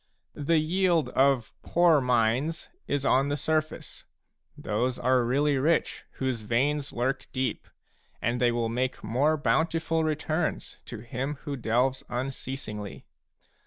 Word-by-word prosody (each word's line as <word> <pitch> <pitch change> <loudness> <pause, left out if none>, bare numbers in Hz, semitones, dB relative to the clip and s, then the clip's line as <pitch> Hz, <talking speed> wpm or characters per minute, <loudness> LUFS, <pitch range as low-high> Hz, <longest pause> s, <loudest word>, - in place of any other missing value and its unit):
The 155 +3 +1
yield 165 -2 +2
of 135 -3 +2
poor 170 -4 +4
mines 125 +6 +1 0.2
is 140 -1 -1
on 135 +2 +3
the 145 - 0
surface; 155 0 -2 0.5
those 125 +4 -1
are 130 -1 +3
really 140 +3 +2
rich 160 +5 +1
whose 130 -4 -2
veins 140 +6 0
lurk 130 +2 -1
deep, 130 -4 -2 0.5
and 120 +2 -1
they 120 -1 +4
will 120 -1 0
make 125 +3 -2
more 145 +8 +2
bountiful 165 +2 +1
returns 155 +1 -2
to 115 -3 -8
him 130 +5 -3
who 145 -2 -3
delves 125 +2 +1
unceasingly. 125 -4 -5
135 Hz, 125 wpm, -27 LUFS, 125-155 Hz, 0.5 s, poor